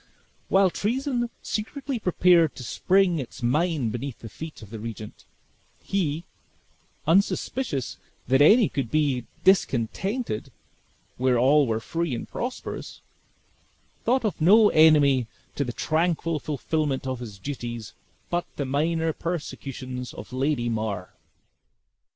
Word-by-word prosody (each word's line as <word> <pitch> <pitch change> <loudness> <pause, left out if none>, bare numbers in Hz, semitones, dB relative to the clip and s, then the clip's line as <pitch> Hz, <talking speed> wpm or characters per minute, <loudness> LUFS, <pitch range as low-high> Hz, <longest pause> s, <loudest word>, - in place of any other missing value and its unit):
While 190 -1 +4
treason 240 - -1
secretly 265 +4 -3
prepared 175 -4 +4
to 125 - -8
spring 185 - +2
its 125 -1 -7
mine 150 0 +1
beneath 120 +3 -5
the 115 - -10
feet 155 -3 -9
of 105 - -13
the 115 - -6
regent, 110 -1 -8 0.5
he, 165 -5 -1 0.8
unsuspicious 185 - 0 0.3
that 135 +3 +4
any 210 +8 +7
could 135 -5 -3
be 135 -4 +1 0.2
discontented 190 - +1 0.7
where 125 -1 +2
all 140 +3 +4
were 110 -1 0
free 165 +4 -2
and 115 - -6
prosperous, 250 +1 -5 1.0
thought 250 0 +2
of 200 -6 -2
no 210 +6 +7
enemy 145 -6 +5 0.3
to 140 - -1
the 125 - -3
tranquil 165 +3 0
fulfillment 150 -1 -2
of 130 -2 -3
his 110 -5 -8
duties 120 -2 -6 0.4
but 175 0 0
the 140 - -2
minor 160 +4 0
persecutions 135 -7 -5
of - - -9
Lady 130 -2 0
Mar. 110 -5 -3
150 Hz, 120 wpm, -25 LUFS, 125-180 Hz, 1.0 s, any